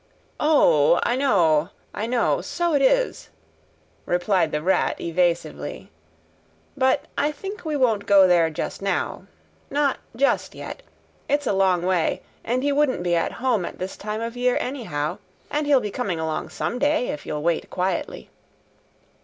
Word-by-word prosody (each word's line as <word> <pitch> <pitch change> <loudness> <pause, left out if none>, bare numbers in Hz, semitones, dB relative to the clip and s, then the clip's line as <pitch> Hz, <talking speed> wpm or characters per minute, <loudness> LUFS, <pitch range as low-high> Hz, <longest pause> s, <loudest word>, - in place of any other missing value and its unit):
"O, 175 - +4
I 240 - +1
know, 175 - +3 0.2
I 215 - -3
know, 240 0 +1
so 345 -1 -1
it 285 - +3
is," - - +1 0.8
replied 175 -2 +1
the 150 0 -2
Rat 190 +2 +1
evasively. 170 - -2 0.8
"But 260 +1 +2
I 295 - +2
think 390 +9 -8
we 310 -2 -2
won't 225 -7 +1
go 195 -2 +7
there 170 -2 +4
just 155 - -5
now. 195 0 -2 0.4
Not 285 -1 +1 0.2
just 275 +4 +1
yet. - - -8 0.5
It's 290 0 +1
a - - +1
long 190 -2 +2
way, 180 -3 0 0.2
and 250 +3 -1
he 285 - +2
wouldn't 280 -9 +1
be 175 -1 +1
at 165 - 0
home 245 -7 0
at - - -6
this 185 +1 -5
time 215 +1 -5
of 230 +1 -4
year 245 0 +1
anyhow, 180 - -3 0.3
and 295 0 -1
he'll 285 -2 +5
be 210 -4 -4
coming 195 -8 -2
along 160 -1 -3
some 245 - -3
day, 290 -2 +1
if 150 - -5
you'll 150 0 -3
wait 170 -1 0
quietly." 185 +1 -3
210 Hz, 160 wpm, -23 LUFS, 175-275 Hz, 0.8 s, go